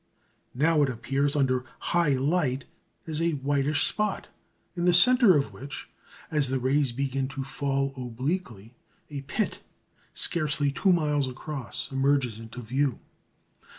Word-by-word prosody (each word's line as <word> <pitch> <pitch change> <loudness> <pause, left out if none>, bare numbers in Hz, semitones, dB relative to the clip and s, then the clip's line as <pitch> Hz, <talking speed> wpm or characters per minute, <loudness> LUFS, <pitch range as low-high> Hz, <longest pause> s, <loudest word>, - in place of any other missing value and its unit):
Now 155 +3 +3
it 140 - +3
appears 135 +4 0
under 130 -3 +1
high 170 -5 +1
light 135 -1 0 0.4
as 160 0 0
a 165 0 +1
whitish 145 +1 +1
spot, 210 0 -1 0.4
in 175 -1 -2
the 175 -1 +5
centre 235 - +6
of 140 - -2
which, 140 +1 -8 0.4
as 150 -3 +2
the 135 +1 0
rays 135 +1 +1
begin 135 +1 -2
to 135 0 -5
fall 135 0 -2
obliquely, 125 - -4 0.4
a 140 -1 -5
pit, 175 +10 -2 0.5
scarcely 150 -4 +2
two 190 +7 +2
miles 150 -5 +1
across, 135 +1 -5
emerges 135 -4 +1
into 115 +2 -9
view. 130 +2 0
140 Hz, 135 wpm, -27 LUFS, 130-155 Hz, 0.5 s, centre